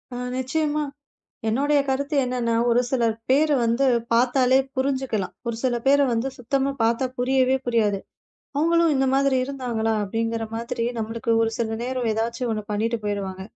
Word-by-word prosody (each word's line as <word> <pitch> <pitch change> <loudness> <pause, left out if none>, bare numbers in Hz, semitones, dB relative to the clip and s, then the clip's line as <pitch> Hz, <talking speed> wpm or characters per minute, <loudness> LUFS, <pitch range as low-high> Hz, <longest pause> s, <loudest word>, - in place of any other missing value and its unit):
அ - - -4 0.2
நிச்சயமா. 300 +3 -1 0.7
என்னோடய 285 +5 +2
கருத்து 280 +3 -1
என்னன்னா, 245 -2 -1 0.2
ஒரு 240 +1 +4
சிலர் 235 -4 +1 0.2
பேரு 295 +2 +4
வந்து 235 +4 +2 0.3
பாத்தாலே 255 +2 +4 0.2
புரிஞ்சுக்கலாம். 260 -7 -1
ஒரு 230 -1 -2
சில 250 -2 +1
பேர 280 +1 +6
வந்து, 235 +3 0
சுத்தமா 270 +3 0
பாத்தா 235 +3 +2
புரியவே 260 +1 +2
புரியாது. 215 -4 +2 0.6
"அவுங்களும் 335 +1 +3
இந்த 265 0 +2
மாதிரி 275 -1 +3
இருந்தாங்களா?" 245 -5 -2
அப்படிங்கிற 225 +2 -2
மாதிரி 230 0 -3
நம்மளுக்கு 230 +2 -2
ஒரு 225 - 0
சில 225 -1 -2
நேரம் 250 -2 -2
எதாச்சும் 235 +2 -2
ஒண்ணு 215 -1 -3
பண்ணீட்டு 225 +3 0
போயிருவாங்க. 195 -2 -3
245 Hz, 145 wpm, -24 LUFS, 225-270 Hz, 0.7 s, பேர